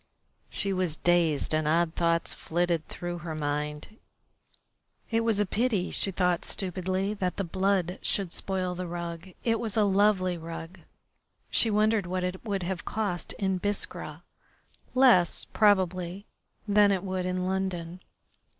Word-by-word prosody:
She 200 -1 -1
was 185 -4 -1
dazed, 165 -4 +2
and 155 -1 +1
odd 165 +1 +2
thoughts 170 -1 +1
flitted 170 -1 -1
through 175 0 -5
her 165 -2 -5
mind. 150 +6 -3 1.1
It 225 - +3
was 225 -2 +1
a 205 - +3
pity, 210 -2 0
she - - +1
thought 180 -2 +1
stupidly, 190 +1 -1
that 185 -4 -2
the 200 - 0
blood 185 0 0
should 195 -4 0
spoil 185 -2 -2
the 180 0 -4
rug. 170 0 -5 0.2
It 225 -1 +1
was 225 -2 -3
a 215 - +5
lovely 195 -3 +2
rug. 165 +2 -8 0.7
She 230 - +4
wondered 215 -2 +2
what 185 0 -2
it 180 +1 -3
would 200 -4 -2
have 180 -1 -3
cost 205 -5 -2
in 190 -2 -1
Biskra 205 +1 -3 0.7
less, 245 -10 +5
probably, 190 -2 +2 0.4
than 205 0 +5
it 190 -1 0
would 185 -1 -2
in 185 0 -1
London. 185 -2 -2
185 Hz, 145 wpm, -28 LUFS, 175-200 Hz, 1.1 s, a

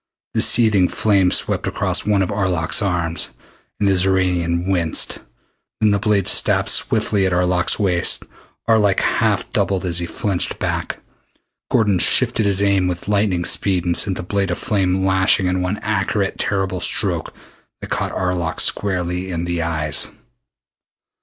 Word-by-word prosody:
The - - +1
searing 105 -6 +3
flame 100 -3 +1
swept - - -1
across - - -2
one 100 -2 +2
of 90 - -3
Arlok's 90 -4 0
arms, 85 -4 -1 0.4
and 105 - +1
the 100 - +3
Xoranian 90 -2 0
winced. 85 -4 -1 0.6
Then 105 -1 +3
the 100 - +1
blade 105 -2 0
stabbed - - +3
swiftly 100 -2 +2
at 90 - -1
Arlok's 90 0 +1
waist. 90 -5 +2 0.4
Arlok 105 -4 +3
half - - 0
doubled 95 -1 0
as 85 -1 +1
he 85 - -4
flinched 95 -2 -3
back. - - -3 0.7
Gordon 105 -5 +2
shifted 115 +1 +2
his 100 0 +2
aim 100 -2 +2
with 90 0 -5
lightning 100 -4 0
speed 95 -3 0
and 85 -1 0
sent 95 -3 +2
the - - -5
blade 100 +1 -1
of 90 - -2
flame 95 -4 0
lashing 95 0 +2
in 90 0 0
one 90 +3 -2
accurate 100 -1 -1
terrible 95 -4 -1
stroke - - +1 0.5
that - - -10
caught - - -2
Arlok 90 -3 -2
squarely 90 -2 0
in 85 -1 -3
the 85 -1 -2
eyes. 80 -2 -1
95 Hz, 155 wpm, -19 LUFS, 90-100 Hz, 0.7 s, searing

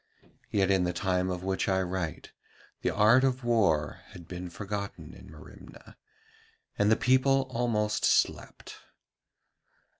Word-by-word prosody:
Yet 100 -1 +1
in 95 -2 +2
the 90 0 -1
time 90 0 -1
of 90 -1 -4
which 95 +1 -1
I 95 0 +2
write 90 -3 -5 0.5
the - - 0
art 110 +5 +4
of 130 -1 0
war 100 -11 +1
had 85 -2 -13
been 90 0 -7
forgotten 100 +2 -6
in - - -14
Merimna, - - -14 0.8
and 105 +1 +2
the - - +6
people 130 +2 +3
almost 110 -3 -1
slept. - - 0
100 Hz, 130 wpm, -28 LUFS, 90-115 Hz, 0.8 s, the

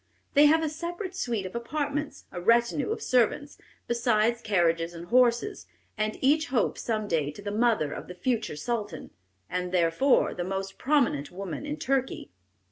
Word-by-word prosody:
They 290 +1 +7
have 320 +2 +4
a - - +1
separate 345 +5 -5
suite 230 - -2
of 185 - -6
apartments, 285 +4 -3
a 175 - -6
retinue 235 - +2
of 445 - -3
servants, 255 +4 +1 0.3
besides 235 -1 +2
carriages 170 -4 +1
and 170 +1 -9
horses, 245 - +2 0.3
and 215 0 -2
each 305 +4 +3
hopes 245 -5 0
some 215 -2 -2
day 155 -6 0
to 150 - -10
be - - -22
the - - -4
mother 220 -10 +2
of - - -7
the 180 - -9
future 225 -2 -1
Sultan, 205 -1 -4 0.4
and 180 0 -3
therefore 180 +10 +3
the 175 - -3
most 195 +1 -4
prominent 255 - +1
woman 190 - -6
in 295 +1 -3
Turkey. 265 - -1
235 Hz, 170 wpm, -27 LUFS, 180-280 Hz, 0.4 s, They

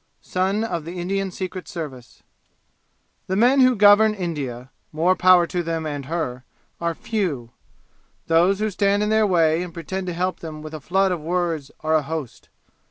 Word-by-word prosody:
Son 190 +4 0
of 175 -8 -3
the 175 +3 -7
Indian 195 +2 -1
Secret 185 0 -6
Service 135 -8 -8 1.0
The 190 - -1
men 245 +6 +4
who 255 -1 +5
govern 210 +1 +6
India 135 - -5 0.2
more 170 +4 +2
power 180 -1 +5
to 175 +1 -2
them 165 -1 -3
and 145 -3 -4
her! 140 -6 -3 0.4
are 170 -1 -1
few. 155 - -3 0.7
Those 175 +4 +3
who 215 +1 -1
stand 200 +1 +1
in 210 - 0
their 220 -1 +3
way 165 -3 +3
and 180 -1 -5
pretend 185 +3 -5
to 180 - -2
help 180 +1 -2
them 155 -2 -8
with 155 0 -8
a 155 - -6
flood 190 +6 +1
of 175 -3 -2
words 165 -3 -2
are 155 0 0
a 155 - +4
host. 150 -3 -6
175 Hz, 175 wpm, -22 LUFS, 155-195 Hz, 1.0 s, govern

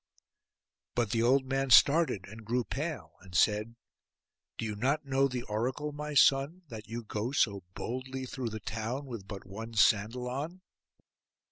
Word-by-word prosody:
But 120 -4 +1
the 115 - +1
old 130 +3 +4
man 135 0 -1
started, 140 - +5
and 110 +3 -10
grew 120 +3 0
pale, 150 +6 -4
and 90 -1 -12
said, 105 +4 +2 0.8
'Do - - -3
you 105 -1 -3
not 135 +8 0
know 135 0 +3
the 125 -2 -4
oracle, 125 +8 -2
my 150 0 -5
son, 140 +7 +4
that 110 -3 -8
you 115 +1 -5
go 110 +3 -3
so 100 -8 +2
boldly 130 +2 -4
through 125 -2 -4
the 110 0 -5
town 115 +7 -4
with 115 -7 -7
but 100 -1 -8
one 110 +4 -8
sandal 110 +3 +3
on? 150 +9 -4
125 Hz, 160 wpm, -31 LUFS, 110-135 Hz, 0.8 s, started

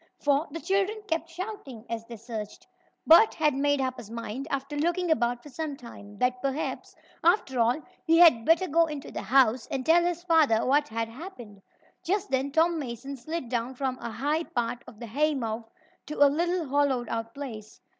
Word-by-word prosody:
For 290 +2 +1
the 330 - -6
children 395 +4 0
kept 330 -1 -2
shouting 330 - -7
as 230 -1 -4
they 235 - -8
searched. 220 -2 -7 0.4
Bert 340 +8 +7
had 305 -2 +2
made 285 +1 +1
up 260 -1 -1
his 225 -3 -10
mind, 230 +4 -5
after 275 0 -3
looking 345 +3 0
about 240 -5 +1
for 295 - -11
some 290 +1 -5
time, 205 -4 -12
that 250 +1 0
perhaps, 275 +3 -3 0.3
after 330 - +2
all, 235 +5 +3 0.2
he 330 0 +4
had 325 -10 +7
better 335 +7 +3
go 330 +2 +3
into 300 -3 -7
the - - -5
house 250 -2 +3
and 260 -1 -3
tell 340 +2 +5
his 345 0 -2
father 310 -10 +3
what 290 +3 +3
had 225 0 -3
happened. 235 - -11 0.4
Just 400 +3 -1
then 270 +1 0
Tom 325 +2 +2
Mason 270 +1 -6
slid 310 +2 -5
down 240 +1 -2
from 260 -1 -2
a - - -5
high 290 +8 -1
part 240 -4 -3
of 215 - -13
the 235 - -6
haymow 240 -3 -1 0.4
to 300 - -5
a 285 - +6
little 345 +1 0
hollowed 270 -3 +1
out 230 0 -4
place. 225 -7 -8
275 Hz, 190 wpm, -27 LUFS, 235-325 Hz, 0.4 s, Bert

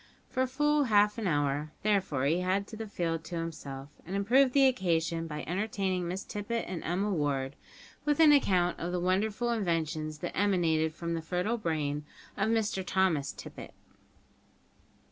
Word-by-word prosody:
For 260 0 +1
full 295 +2 +2
half 210 -1 +3
an 215 - -1
hour, 145 -1 0
therefore, 190 -10 +1
he 160 +5 +2
had 185 +2 0
the 220 +1 -7
field 165 -5 -2
to 175 - -6
himself, 145 -5 -5
and 185 - -5
improved 250 +7 +4
the 275 -1 +6
occasion 165 -8 0
by 150 -1 -5
entertaining 190 -1 -1
Miss 185 +3 -3
Tippet 220 +3 -3
and 180 -2 -5
Emma 195 +5 0
Ward 140 -4 -1 0.5
with 295 0 +1
an 315 -2 +8
account 185 -11 +3
of 175 +1 -3
the 180 - -1
wonderful 205 +6 0
inventions 160 -7 -1
that - - -5
emanated 165 -6 +2
from 170 0 -3
the 165 - -2
fertile 180 +8 -1
brain 150 -5 -1 0.3
of 200 +2 0
Mr 220 -4 0
Thomas 175 -6 +1
Tippet. - - -10
180 Hz, 160 wpm, -30 LUFS, 160-210 Hz, 0.5 s, an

